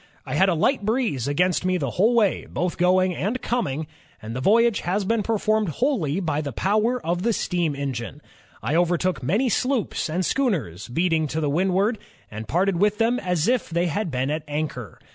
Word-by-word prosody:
I - - -5
had 190 +1 +4
a 175 - +1
light 225 - +1
breeze 215 - 0
against 180 +6 +1
me 185 0 +1
the 140 -7 -2
whole 220 +6 +2
way, 215 -4 +2
' - - -19
both 180 0 -2
going 185 +1 +3
and 220 +7 -2
coming, 160 - -2 0.3
and 110 +2 -7
the 130 - -3
voyage 230 - +4
has 190 +3 -1
been 225 +2 +1
performed 215 -1 0
wholly 190 - 0
by 155 -5 -1
the 145 -2 -4
power 215 - +1
of 175 +1 0
the 230 +4 +1
steam 175 -7 -1
engine. 125 - -4 0.4
I 125 +7 -1
overtook 175 +2 +1
many 200 - +1
sloops 250 - 0
and 175 +4 -1
schooners 155 - -1
beating 160 +3 +1
to 155 +3 -3
the 150 -2 0
windward, 190 +7 +1 0.3
and 110 0 -7
parted 185 - +1
with 205 +3 +2
them 235 +2 +2
as 180 -2 0
if 250 -1 +1
they 170 +1 0
had 180 +3 -1
been 130 0 -1
at 155 +1 -2
anchor. 145 -6 -4
180 Hz, 200 wpm, -24 LUFS, 150-215 Hz, 0.4 s, had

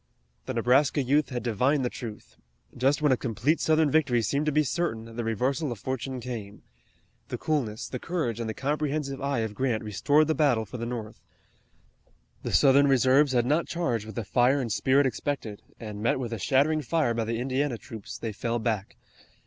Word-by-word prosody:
The 130 - -3
Nebraska 130 +5 +3
youth 145 +4 +2
had 120 -3 -4
divined 125 +5 +1
the - - 0
truth. 110 -4 -8 0.4
Just 135 +4 +1
when 150 - +4
a - - +5
complete 125 +6 0
Southern 155 -2 +3
victory 130 -7 +2
seemed 140 +7 0
to - - +3
be 150 +1 +3
certain 115 -7 -3
the 120 - -3
reversal 130 +6 -1
of 120 - -4
fortune 130 +3 -4
came. 110 -5 -7 0.6
The - - -4
coolness, 125 -9 -2
the 125 - -5
courage, 150 -10 -2
and 115 -1 -3
the 110 - -4
comprehensive 145 -1 -2
eye 140 -3 0
of 110 -2 -3
Grant 120 -2 -1
restored 145 +9 +2
the 155 - +1
battle 135 -8 +2
for 115 - -8
the 115 0 -4
North. 115 -3 -6 1.2
The - - -4
Southern 140 0 +5
reserves 135 +1 +4
had 120 -1 +2
not 150 +6 +1
charged 120 -11 -2
with 110 - -9
the 115 - -3
fire 125 +6 +3
and 120 -4 -3
spirit 135 +6 +3
expected, 130 -5 -3 0.2
and, 105 -3 -7
met 115 +3 +1
with 120 -3 -4
a 115 - -4
shattering 145 +7 +2
fire 150 -3 +1
by 115 -1 -1
the 115 +1 -2
Indiana 130 +1 -1
troops, 110 -3 -9
they 115 - -4
fell 115 +2 -2
back. 110 -3 -2
130 Hz, 195 wpm, -27 LUFS, 115-145 Hz, 1.2 s, a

